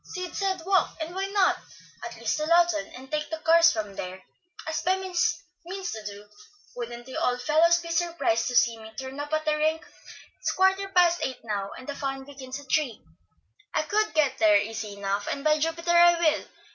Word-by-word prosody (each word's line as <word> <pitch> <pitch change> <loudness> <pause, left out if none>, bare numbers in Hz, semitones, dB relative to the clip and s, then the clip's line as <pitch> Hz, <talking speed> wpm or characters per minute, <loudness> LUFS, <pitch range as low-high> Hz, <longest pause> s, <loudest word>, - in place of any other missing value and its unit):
"Sid 365 -2 -6
said, 380 -4 -1
'Walk,' 380 -1 +2
and 320 +2 -5
why 385 +1 -2
not? 395 -1 +2 0.4
at - - -6
least - - -1
to 305 0 -2
Lawton, 340 -2 +3
and 265 +2 -12
take 300 0 -2
the 320 - -3
cars 330 +1 +5
from 210 -3 -4
there, 185 0 -6 0.4
as 315 0 -2
Bemis 370 -1 0 0.2
means 375 +1 -5
to 220 - -6
do. 205 0 -8 0.5
Wouldn't 240 0 -6
the 260 - -7
old 250 0 +1
fellows 325 +4 +4
be 340 -1 -6
surprised 335 -9 +1
to 245 - -3
see 230 -2 +3
me 220 0 -11
turn 265 +1 -6
up 290 +1 -5
at 310 0 0
the 305 0 +2
rink? 315 +1 0 0.5
It's - - -1
quarter 385 +1 +2
past 350 -2 +4
eight 260 -1 -3
now, 205 -3 -3
and 255 - -11
the 285 - -3
fun 270 -1 -4
begins 270 -1 -8
at 285 - -13
three; 280 -8 +1 0.8
I - - +2
could 430 -2 0
get 285 -4 +2
there 215 -2 +6
easy 210 0 -4
enough, 200 0 -2
and 280 - -3
by 305 0 +3
Jupiter, 330 +2 -1
I 345 0 +6
will! 320 -3 +2
305 Hz, 205 wpm, -26 LUFS, 245-345 Hz, 0.8 s, there